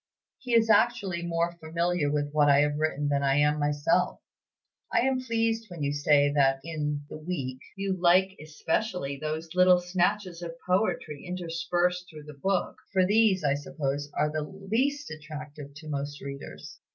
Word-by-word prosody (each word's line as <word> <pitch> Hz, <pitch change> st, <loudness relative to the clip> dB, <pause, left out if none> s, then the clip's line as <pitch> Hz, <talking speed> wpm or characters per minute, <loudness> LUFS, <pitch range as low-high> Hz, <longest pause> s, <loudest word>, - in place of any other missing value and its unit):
He 245 Hz, -3 st, -1 dB
is 225 Hz, -1 st, +5 dB
actually 220 Hz, -6 st, +2 dB
more 170 Hz, 0 st, 0 dB
familiar 170 Hz, -1 st, 0 dB
with 145 Hz, -1 st, -1 dB
what 150 Hz, -1 st, +4 dB
I 140 Hz, 0 st, +6 dB
have 150 Hz, 0 st, 0 dB
written 150 Hz, -2 st, 0 dB
than 140 Hz, -1 st, +1 dB
I 135 Hz, -1 st, +2 dB
am 150 Hz, +1 st, +3 dB
myself. 145 Hz, 0 st, +1 dB, 0.7 s
I -, -, +3 dB
am 260 Hz, 0 st, +1 dB
pleased 225 Hz, -2 st, 0 dB
when 170 Hz, -4 st, -6 dB
you 140 Hz, 0 st, 0 dB
say 145 Hz, 0 st, +3 dB
that 135 Hz, -2 st, +3 dB
in 150 Hz, -2 st, -3 dB
'The 155 Hz, -, -8 dB
Week' 140 Hz, -6 st, -4 dB
you 195 Hz, -1 st, -1 dB
like 185 Hz, +2 st, +4 dB
especially 155 Hz, -1 st, -2 dB
'those 155 Hz, +1 st, -4 dB
little 180 Hz, 0 st, +6 dB
snatches 180 Hz, 0 st, -1 dB
of 165 Hz, -1 st, -6 dB
poetry 180 Hz, -6 st, 0 dB
interspersed 180 Hz, 0 st, -1 dB
through 155 Hz, -2 st, -11 dB
the 150 Hz, 0 st, -10 dB
book;' 195 Hz, -2 st, 0 dB
for 190 Hz, -2 st, +3 dB
these, 205 Hz, -2 st, +3 dB
I 140 Hz, -2 st, +3 dB
suppose, 145 Hz, 0 st, -3 dB
are 150 Hz, 0 st, +1 dB
the 155 Hz, 0 st, -2 dB
least 225 Hz, -, -2 dB
attractive 150 Hz, -2 st, -9 dB
to 155 Hz, +1 st, -11 dB
most 145 Hz, 0 st, -4 dB
readers. 140 Hz, 0 st, -9 dB
160 Hz, 165 wpm, -28 LUFS, 145-185 Hz, 0.7 s, I